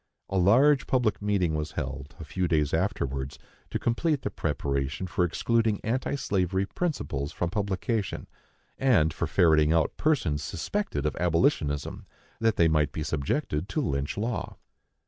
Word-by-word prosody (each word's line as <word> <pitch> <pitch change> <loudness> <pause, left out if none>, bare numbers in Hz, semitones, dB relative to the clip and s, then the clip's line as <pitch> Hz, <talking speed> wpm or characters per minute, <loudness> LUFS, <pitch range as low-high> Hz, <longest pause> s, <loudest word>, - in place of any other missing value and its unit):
A 95 - -1
large 130 +10 +5
public 115 -7 +1
meeting 100 -5 +1
was 75 0 -3
held, 70 0 -5
a - - -6
few 90 +5 -1
days 75 -3 +1
afterwards, 70 -7 -1 0.3
to - - -1
complete 145 +5 0
the 105 - -2
preparation 70 0 -2
for 90 0 0
excluding 110 +4 +1
anti 125 +5 -1
slavery 95 -6 0
principles 95 - -3
from 85 -1 -2
publication, 100 +1 -2 0.5
and 85 -13 +3
for - - -2
ferreting 80 -3 +4
out 80 -1 +2
persons 90 - +1
suspected 205 - -3
of 75 - 0
abolitionism, 85 - 0 0.3
that 115 -2 +2
they 85 - +4
might 75 -2 +2
be 80 - -3
subjected 75 - -1
to - - -1
Lynch 70 - -1
law. 105 -3 -3
90 Hz, 145 wpm, -27 LUFS, 75-115 Hz, 0.5 s, large